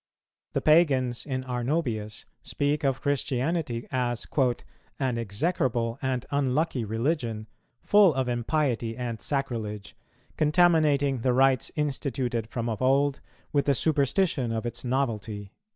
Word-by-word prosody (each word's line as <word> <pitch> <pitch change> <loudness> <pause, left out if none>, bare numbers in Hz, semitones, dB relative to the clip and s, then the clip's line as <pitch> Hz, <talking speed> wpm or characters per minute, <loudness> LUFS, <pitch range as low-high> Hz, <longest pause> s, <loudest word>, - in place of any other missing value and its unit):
The - - 0
Pagans 135 -7 +3
in 130 -2 -2
Arnobius 125 -4 -2 0.2
speak 145 +1 -1
of 135 -1 0
Christianity 140 -2 -1
as 120 -2 -1 0.7
"an 130 -4 -1
execrable 115 - -1
and 130 -2 -1
unlucky 140 -1 0
religion, 115 0 -2 0.4
full 205 -3 +6
of 130 -1 0
impiety 120 -2 -1
and 120 -4 -4
sacrilege, 110 -8 -3 0.4
contaminating 150 -4 +3
the 125 +2 +1
rites 130 -1 +3
instituted 130 -6 -2
from 115 0 -3
of 110 -3 -3
old 135 +2 +2 0.3
with 140 -2 +2
the 140 - +3
superstition 140 -2 +1
of 115 +1 -2
its 120 - -4
novelty." 110 -6 -2
130 Hz, 120 wpm, -27 LUFS, 115-145 Hz, 0.7 s, full